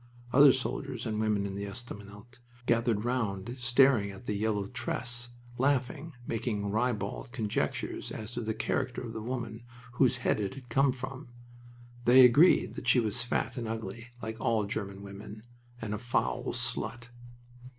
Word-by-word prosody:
Other 140 +1 +9
soldiers 130 -1 -3
and 110 -2 -1
women 105 -2 +1
in 100 - -4
the 100 +1 -4
estaminet 105 +2 -8 0.3
gathered 115 -2 +2
round 115 -3 -1
staring 120 -3 +4
at 100 +5 -10
the 105 - -1
yellow 105 -1 0
tress, 120 +1 -3 0.3
laughing, 140 +4 0
making 105 -3 -2
ribald 110 0 -1
conjectures 110 -3 -2
as 110 +1 -6
to 120 - -3
the 110 -1 -2
character 125 +2 -1
of 115 -2 -6
the 110 - -5
woman 115 -1 -4
from 125 +1 -18
whose 125 -2 +4
head 120 - +1
it 100 +3 -2
had 130 -3 -11
come. 135 +2 +3 1.1
They 125 +1 +9
agreed 145 +9 +6
that 125 - -7
she 130 +1 +6
was 110 0 +1
fat 120 +3 -1
and 115 -2 -3
ugly, 115 +1 -5 0.2
like 110 +1 -5
all 110 -2 +2
German 100 -2 -4
women, 100 +2 -9 0.4
and 110 -2 -4
a 105 - -3
foul 110 - 0
slut. 115 +3 -2
115 Hz, 160 wpm, -30 LUFS, 105-125 Hz, 1.1 s, Other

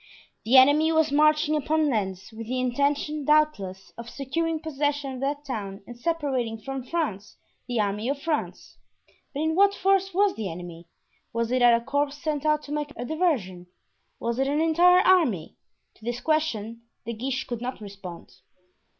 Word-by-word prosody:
The 250 +4 +5
enemy 290 +5 +6
was 320 -2 +2
marching 305 +1 +3
upon 305 +1 +1
Lens, 190 -6 -2
with 225 0 -8
the 255 +2 -2
intention, 285 +4 0
doubtless, 265 -11 +1
of 235 0 -7
securing 320 +5 -2
possession 290 -2 -2
of 255 - -7
that 285 +2 -2
town 200 -7 -5
and 240 - -10
separating 260 -6 -2
from 270 +3 -5
France 245 - -3 0.3
the 245 -2 -1
army 210 +3 -1
of 280 0 -1
France. 305 0 -4 0.5
But 290 - -4
in 315 0 +1
what 400 +3 +4
force 390 0 +2
was 395 +2 +2
the 205 -5 -4
enemy? 170 0 -9 0.5
Was 230 0 -1
it 255 0 +1
a 240 -1 +6
corps 285 +1 +1
sent 300 0 -3
out 305 0 +2
to 290 - -10
make 295 -1 -3
a 245 - -5
diversion? 245 - -1 0.5
Was 235 +1 -2
it 270 - +2
an 290 +2 0
entire 345 +3 +5
army? 305 - +2 0.4
To - - -22
this 240 +1 -3
question 230 -9 -1 0.2
De 235 - -3
Guiche 260 +4 -3
could 240 -2 -5
not 255 +1 -4
respond. 195 -9 -10
275 Hz, 170 wpm, -26 LUFS, 230-305 Hz, 0.5 s, enemy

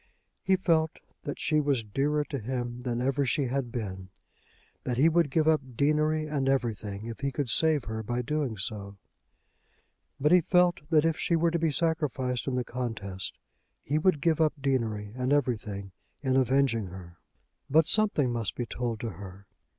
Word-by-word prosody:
He 190 - +3
felt 165 -4 +1 0.3
that 145 - -4
she 155 - +2
was 140 -5 +1
dearer 145 +8 0
to 140 -2 -4
him 120 +1 -4
than 120 -1 -2
ever 135 +2 +1
she 135 +2 +1
had 130 -1 -2
been, 95 -6 -5 0.7
that 125 -1 -2
he 145 +5 +5
would 165 -2 +3
give 155 +3 +2
up 155 -2 +4
deanery 155 +3 +2
and 140 -3 -1
everything 110 -6 -1
if 115 -1 -6
he 140 0 -1
could 135 -1 -2
save 155 +3 +3
her 110 +1 -4
by 120 +3 -2
doing 140 -4 -1
so. 100 0 -5 1.2
But 150 +3 +3
he 180 0 +7
felt 180 +1 +3
that 155 -2 +4
if 165 0 +1
she 170 - +1
were 165 0 +2
to 170 - 0
be 165 0 +2
sacrificed 145 -6 -1
in 130 - 0
the 125 - 0
contest, 110 -7 -5 0.5
he 150 +2 0
would 160 -3 +2
give 160 0 +2
up 155 -1 +3
deanery 115 -7 -1
and 130 +1 -1
everything 105 -8 -1 0.3
in 130 -1 +1
avenging 130 -4 +2
her. 90 -1 -11 0.5
But 160 +3 +5
something 180 - +2
must 115 -4 -2
be 120 - -2
told 115 -1 -3
to 115 - -2
her. 95 +1 -10
130 Hz, 180 wpm, -28 LUFS, 115-155 Hz, 1.2 s, he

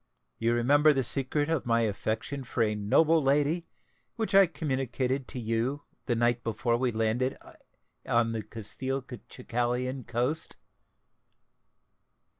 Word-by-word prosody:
You 115 +1 +2
remember 145 +6 +4
the 135 -2 0
secret 140 +4 +1
of 160 -6 -1
my 115 0 +3
affection 115 +5 -2
for 120 -1 0
a 105 -1 +1
noble 155 +11 +3
lady, 145 +5 +1 0.5
which 220 -3 -2
I 195 -1 +7
communicated 135 -4 -2
to 125 - -6
you 120 +5 -1 0.2
the 120 - +1
night 120 +1 +1
before 115 +1 0
we 125 +1 0
landed 115 +4 0 0.7
on 115 -1 +2
the 115 -1 -2
Castelcicalan 125 +2 -4
coast?" 125 +7 -1
125 Hz, 120 wpm, -28 LUFS, 115-140 Hz, 0.7 s, I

